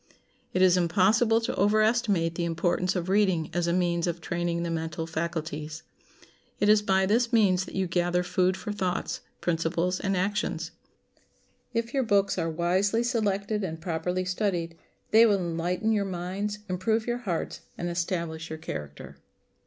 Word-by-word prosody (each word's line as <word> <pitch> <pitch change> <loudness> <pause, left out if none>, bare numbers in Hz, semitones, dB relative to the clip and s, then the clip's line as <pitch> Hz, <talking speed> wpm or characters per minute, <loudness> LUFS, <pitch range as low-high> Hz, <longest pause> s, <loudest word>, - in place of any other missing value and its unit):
It 185 - +2
is 185 -1 +5
impossible 210 +7 +3
to 225 - -2
overestimate 210 -4 +2
the 170 - -2
importance 175 +2 0
of 175 -1 -2
reading 190 -5 +2
as 175 0 0
a - - +2
means 175 -1 +1
of 170 0 -2
training 170 0 -2
the 170 - -2
mental 160 0 -3
faculties. 160 -1 -4 0.8
It 205 - +3
is 210 0 +6
by 190 -2 +2
this 230 +4 +2
means 190 -5 +3
that - - -10
you 190 0 +1
gather 175 0 +1
food 185 +1 +1
for 210 - -5
thoughts, 190 -3 -2 0.2
principles, 170 +2 0
and 195 -1 0
actions. 185 -3 -1 1.0
If 230 0 -2
your 275 - +2
books 200 -5 +2
are 165 -1 0
wisely 185 +7 +1
selected 210 -3 0
and 165 -3 -4
properly 180 +2 -2
studied, 180 -3 -1 0.4
they 225 +2 +7
will 205 -2 +3
enlighten 175 +4 -1
your 210 -2 +2
minds, 190 +3 -3
improve 220 +5 0
your 240 0 -1
hearts, 180 -9 -3 0.2
and 175 - -3
establish 170 -2 -3
your 160 - -5
character. 75 - -7
180 Hz, 160 wpm, -27 LUFS, 170-205 Hz, 1.0 s, they